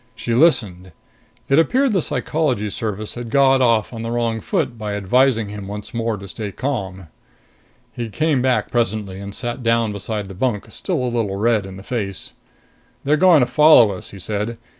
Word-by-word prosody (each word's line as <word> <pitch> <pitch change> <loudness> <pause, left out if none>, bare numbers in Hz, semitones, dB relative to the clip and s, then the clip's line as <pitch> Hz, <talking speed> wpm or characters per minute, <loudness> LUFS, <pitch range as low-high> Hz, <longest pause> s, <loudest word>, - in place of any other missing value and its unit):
She 120 - -3
listened. 105 - +2 0.5
It 140 +3 +4
appeared 255 +8 +2
the 190 - +2
Psychology 130 -11 -1
Service 110 -2 -4
had 120 -1 -7
got 135 +1 +4
off 115 -2 +2
on 115 - -6
the 115 - -4
wrong 115 -1 -1
foot 155 - -1
by 105 -2 -4
advising 115 +2 +2
him 100 -1 -7
once 105 +1 -7
more 115 -2 -1
to 100 0 -10
stay 105 +2 -6
calm. 95 -8 -4 0.9
He 120 -2 -5
came 155 +2 +1
back 130 -1 +1
presently 105 -5 -1
and 100 0 -7
sat 120 0 -4
down 115 -2 +1
beside 105 0 -4
the 95 - -9
bunk, 105 +1 -1
still 170 - -2
a - - 0
little 115 -5 -1
red 110 -1 +1
in 95 0 -9
the 95 - -11
face. 100 -5 -4 0.7
"They're 145 +2 +3
going 170 -2 +5
to - - +4
follow 150 -7 +6
us," 95 - -8
he 100 - -11
said. 105 +4 -3
115 Hz, 185 wpm, -20 LUFS, 100-130 Hz, 0.9 s, follow